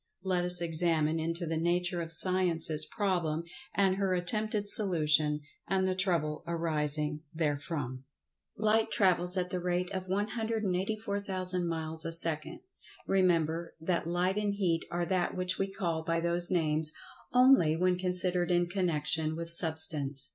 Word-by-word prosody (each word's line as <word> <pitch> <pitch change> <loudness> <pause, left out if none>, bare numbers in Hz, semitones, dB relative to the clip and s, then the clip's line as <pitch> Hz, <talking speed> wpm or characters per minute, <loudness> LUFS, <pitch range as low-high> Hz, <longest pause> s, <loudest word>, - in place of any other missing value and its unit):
Let 185 -2 -1
us 180 0 +3
examine 165 -1 +1
into 165 +2 -3
the 165 0 -3
nature 175 +1 -1
of 165 0 -7
Science's 165 -3 +3
problem, 175 -6 -2 0.3
and 195 -1 +1
her 195 -2 0
attempted 210 +4 0
solution, 155 -7 +1 0.3
and 190 -1 0
the 185 - 0
trouble 170 -5 -1
arising 150 -2 -1
therefrom. 145 -4 -3 0.5
Light 220 +1 +1
travels 180 -4 +4
at 180 0 -2
the 180 - -2
rate 180 0 -2
of 185 -1 -5
184,000 200 -3 -2
miles 160 -1 -1
a 165 - -4
second. 165 -2 +1 0.4
Remember, 170 -3 0
that 170 0 -2
Light 180 +3 -1
and 205 -1 -2
Heat 175 -5 -1
are 175 0 -3
that 180 -1 -2
which 185 0 -2
we 195 - 0
call 175 -5 -3
by 165 +1 -1
those 170 +1 +2
names 155 -3 +1 0.4
only 250 -11 +4
when 180 +2 +1
considered 180 -1 +2
in 175 0 +2
connection 160 -3 -1
with 165 0 -4
Substance. 155 -5 +4
175 Hz, 140 wpm, -29 LUFS, 160-185 Hz, 0.5 s, travels